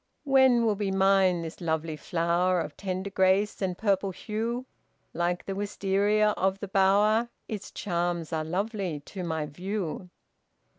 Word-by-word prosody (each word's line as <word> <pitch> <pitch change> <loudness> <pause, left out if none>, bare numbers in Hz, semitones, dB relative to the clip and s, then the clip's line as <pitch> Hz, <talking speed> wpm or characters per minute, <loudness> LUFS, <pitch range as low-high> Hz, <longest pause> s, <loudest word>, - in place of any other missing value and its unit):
"When 265 -4 +5
will 220 - +3
be 205 -1 -2
mine 190 -2 +3
this 165 +2 -8
lovely 160 -1 -1
flower 175 +3 +1
Of - - -4
tender 190 0 -4
grace 190 +2 +2
and 185 -2 -1
purple 200 -2 +1
hue? 225 +6 -3 0.5
Like 175 +1 -1
the 195 - -3
Wistaria 205 +1 +1
of 190 +1 +1
the 200 - -5
bower, 205 +4 +3 0.2
Its 210 -2 -5
charms 175 -3 -2
are 160 -1 0
lovely 185 -2 -2
to 185 +5 -7
my 160 -3 -2
view." 180 +3 -4
190 Hz, 145 wpm, -28 LUFS, 175-205 Hz, 0.5 s, When